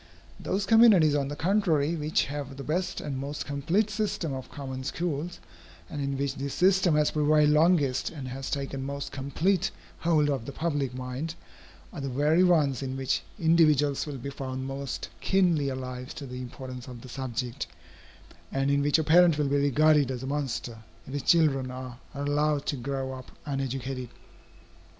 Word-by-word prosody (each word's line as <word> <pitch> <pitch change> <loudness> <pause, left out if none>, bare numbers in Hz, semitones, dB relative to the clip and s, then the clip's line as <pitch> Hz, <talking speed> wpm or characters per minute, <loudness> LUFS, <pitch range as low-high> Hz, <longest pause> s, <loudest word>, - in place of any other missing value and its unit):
Those 195 +1 -1
communities 205 -8 +6
on 140 -2 +1
the 145 - -4
contrary 165 -4 +2
which 155 0 +1
have 140 -1 -6
the 140 - -6
best 175 +5 -2
and 135 -3 -4
most 140 +2 -4
complete 165 +10 0
system 205 -8 -1
of 130 -1 -6
common 130 -2 -6
schools, 165 +3 -3 0.5
and 145 - -4
in 140 0 -2
which 140 0 -1
this 140 0 -4
system 185 -2 +4
has 150 0 +3
prevailed 150 0 +4
longest 150 -5 +3
and 140 -5 -7
has 130 +1 -5
taken 135 -1 -3
most 140 +1 -4
complete 160 +7 0 0.3
hold 160 -3 +3
of 135 -5 -1
the - - -4
public 145 -4 -2
mind, 130 +6 -4 0.6
are 160 - -6
the 135 - -3
very 150 +7 +3
ones 150 -8 +3
in 130 -1 -3
which 130 -12 0 0.2
individuals 155 -4 +3
will 145 -2 -5
be 140 +3 -6
found 130 -1 -5
most 135 0 -4
keenly 175 -7 +2
alive 125 -1 -5
to 145 - -6
the 125 -1 -6
importance 125 0 -8
of 125 -2 -9
the 130 - -10
subject, 125 0 -4 0.8
and 135 +1 +1
in 140 0 +3
which 145 +2 +3
a 160 - +1
parent 165 0 +6
will 145 -2 +1
be 140 - +2
regarded 145 0 +4
as 130 -1 -4
a - - -3
monster, 135 -5 -3 0.3
if 130 - -9
his 145 - -1
children 135 -4 +3
are 130 -1 -7 0.2
allowed 145 +1 0
to - - -1
grow 135 +1 -3
up 130 -1 -9 0.2
uneducated. 135 -2 -3
140 Hz, 175 wpm, -28 LUFS, 130-155 Hz, 0.8 s, communities